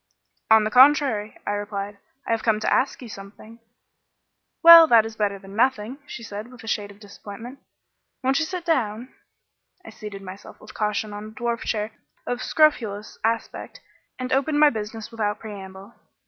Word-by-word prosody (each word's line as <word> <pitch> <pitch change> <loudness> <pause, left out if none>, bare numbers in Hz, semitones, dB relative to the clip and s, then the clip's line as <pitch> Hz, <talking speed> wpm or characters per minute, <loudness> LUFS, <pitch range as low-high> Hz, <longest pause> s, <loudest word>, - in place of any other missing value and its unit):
"On 220 -1 +6
the 215 - -2
contrary," 255 -5 +4
I - - -1
replied, 205 0 -5 0.3
"I - - -3
have 225 -1 +1
come 220 -2 +1
to - - +1
ask 265 0 0
you - - -8
something." 210 +2 -12 1.0
"Well, 335 -1 +11
that 230 -4 +5
is 225 0 -7
better 205 -2 -1
than 195 +1 -13
nothing," 250 +1 0
she 230 - -8
said, 210 +2 -8
with 250 -3 -14
a - - -11
shade 205 -2 -2
of 200 0 -15
disappointment. 215 +5 -11 0.6
"Won't 265 +3 +2
you 320 - 0
sit 360 0 -6
down?" 245 -6 -1 0.7
I - - -10
seated 210 -2 -9
myself 190 +1 -11
with 215 0 -14
caution 210 0 -2
on 205 +1 -7
a - - -9
dwarf 235 -1 -1
chair 215 -1 -3 0.3
of 245 0 -3
scrofulous 225 -10 +1
aspect, 230 - -3 0.4
and 255 0 -3
opened 290 +3 +1
my 300 -1 +6
business 220 0 -6
without 210 -2 -2
preamble. 195 -1 -10
220 Hz, 175 wpm, -23 LUFS, 205-255 Hz, 1.0 s, Well